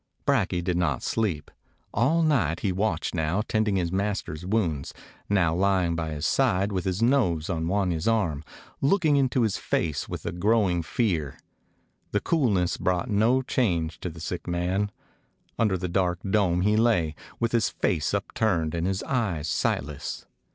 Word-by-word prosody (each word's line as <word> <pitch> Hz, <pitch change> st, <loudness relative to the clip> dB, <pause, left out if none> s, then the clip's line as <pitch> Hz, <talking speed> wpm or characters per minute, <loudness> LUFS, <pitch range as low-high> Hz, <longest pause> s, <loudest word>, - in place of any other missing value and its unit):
Brakje 90 Hz, -1 st, +1 dB
did 90 Hz, -1 st, 0 dB
not 80 Hz, -7 st, 0 dB
sleep. 90 Hz, -10 st, -1 dB, 0.4 s
All 160 Hz, +8 st, +2 dB
night 100 Hz, -, +1 dB
he 100 Hz, -, 0 dB
watched, 90 Hz, -2 st, -1 dB
now 85 Hz, +5 st, 0 dB
tending 110 Hz, -2 st, +1 dB
his 85 Hz, -3 st, 0 dB
master's 95 Hz, -5 st, -2 dB
wounds, 85 Hz, -10 st, -1 dB, 0.3 s
now 90 Hz, -5 st, +3 dB
lying 90 Hz, -2 st, +2 dB
by 80 Hz, -1 st, -2 dB
his 75 Hz, 0 st, -4 dB
side, 95 Hz, +6 st, +2 dB
with 95 Hz, -2 st, -2 dB
his 95 Hz, +3 st, 0 dB
nose 100 Hz, -, +2 dB
on 80 Hz, -1 st, -2 dB
Wan 95 Hz, 0 st, +1 dB
ya's 80 Hz, +2 st, -2 dB
arm, 85 Hz, -10 st, +1 dB, 0.4 s
looking 155 Hz, +1 st, +3 dB
into 130 Hz, -3 st, +2 dB
his 110 Hz, -4 st, 0 dB
face 75 Hz, -3 st, -2 dB
with -, -, -6 dB
a -, -, -1 dB
growing 95 Hz, -1 st, +2 dB
fear. 80 Hz, -, -1 dB, 0.8 s
The 105 Hz, -, +3 dB
coolness 105 Hz, -, +1 dB
brought 90 Hz, +6 st, -1 dB
no 115 Hz, +6 st, +3 dB
change 85 Hz, -12 st, 0 dB
to 90 Hz, -, -4 dB
the 85 Hz, 0 st, -11 dB
sick 85 Hz, +1 st, -5 dB
man. 90 Hz, +4 st, 0 dB, 0.7 s
Under 105 Hz, -5 st, +2 dB
the 90 Hz, 0 st, -3 dB
dark 90 Hz, -1 st, +1 dB
dome 95 Hz, -3 st, +2 dB
he 105 Hz, +3 st, +3 dB
lay, 110 Hz, -9 st, +2 dB, 0.3 s
with 115 Hz, -1 st, 0 dB
his 115 Hz, -2 st, +2 dB
face 80 Hz, 0 st, 0 dB
upturned 100 Hz, -6 st, 0 dB
and 85 Hz, +1 st, -1 dB
his 95 Hz, 0 st, -1 dB
eyes 100 Hz, -, -1 dB
sightless. 75 Hz, -1 st, -2 dB
95 Hz, 165 wpm, -26 LUFS, 85-110 Hz, 0.8 s, now